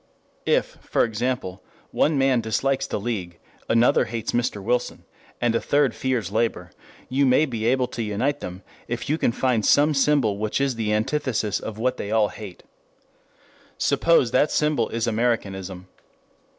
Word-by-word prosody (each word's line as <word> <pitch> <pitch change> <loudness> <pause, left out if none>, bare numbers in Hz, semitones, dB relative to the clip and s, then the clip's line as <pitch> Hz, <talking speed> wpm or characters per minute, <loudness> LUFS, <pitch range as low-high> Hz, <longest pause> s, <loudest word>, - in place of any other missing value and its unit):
If, - - +1
for - - +1
example, 110 -5 -2 0.3
one 150 -1 +2
man 135 -3 +3
dislikes 135 +5 0
the - - -3
League, 95 -6 -4 0.3
another 115 +2 +4
hates 115 -1 -4
Mr. 120 -3 -1
Wilson, 120 +5 -2 0.4
and 120 -1 +1
a 115 - 0
third 145 -4 +2
fears 120 -8 -2
labor, 115 +2 -1 0.4
you 135 +2 +1
may 130 +3 +4
be 115 -5 -3
able 130 +1 +2
to 115 - -5
unite 115 +7 -1
them 90 +2 -8 0.2
if 120 +3 -4
you 155 - 0
can - - +2
find 120 -2 0
some 150 +6 +4
symbol 135 -7 +2
which 110 +3 -1
is 140 -1 +1
the 110 -2 -2
antithesis 110 -1 0
of 110 -1 -7
what 125 +3 0
they 100 - -5
all 110 -1 +2
hate. 100 -5 -10 1.1
Suppose 165 -8 +3
that 145 +4 +3
symbol 150 -1 +1
is 115 0 -2
Americanism. 100 -6 -2
115 Hz, 160 wpm, -23 LUFS, 105-130 Hz, 1.1 s, another